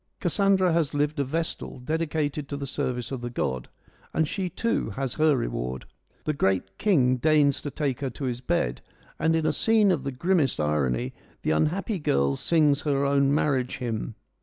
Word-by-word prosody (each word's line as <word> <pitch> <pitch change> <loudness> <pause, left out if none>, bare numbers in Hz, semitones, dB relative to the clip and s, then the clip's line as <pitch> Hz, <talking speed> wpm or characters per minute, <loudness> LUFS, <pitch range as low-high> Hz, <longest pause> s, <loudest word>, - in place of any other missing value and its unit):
Cassandra 195 -3 +3
has 160 -3 +1
lived 145 +1 0
a - - +3
vestal, 160 +5 -3
dedicated 150 +1 -2
to 140 - -3
the 140 - -4
service 125 -2 -3
of 130 -3 -4
the 120 - -4
god, 65 - -3 0.5
and 160 -1 +2
she 185 +3 -2
too 230 - -1
has 130 +5 -3
her 155 -3 +3
reward. 65 - -3 0.4
The 155 - 0
great 95 -6 0
king 130 -12 +3
deigns 145 0 +3
to 145 - -4
take 140 -3 -2
her 140 -2 -2
to 120 +3 -8
his 125 -2 -2
bed, 60 - -1 0.4
and 160 0 +2
in 160 -1 0
a - - +2
scene 220 -3 +4
of 155 -7 0
the 140 - -2
grimmest 150 - +1
irony 65 -5 0 0.3
the - - +1
unhappy 180 - 0
girl 70 - +1
sings 150 - +3
her 140 -2 +1
own 140 0 +3
marriage 135 -4 +1
hymn. 115 -3 -3
140 Hz, 185 wpm, -26 LUFS, 120-160 Hz, 0.5 s, scene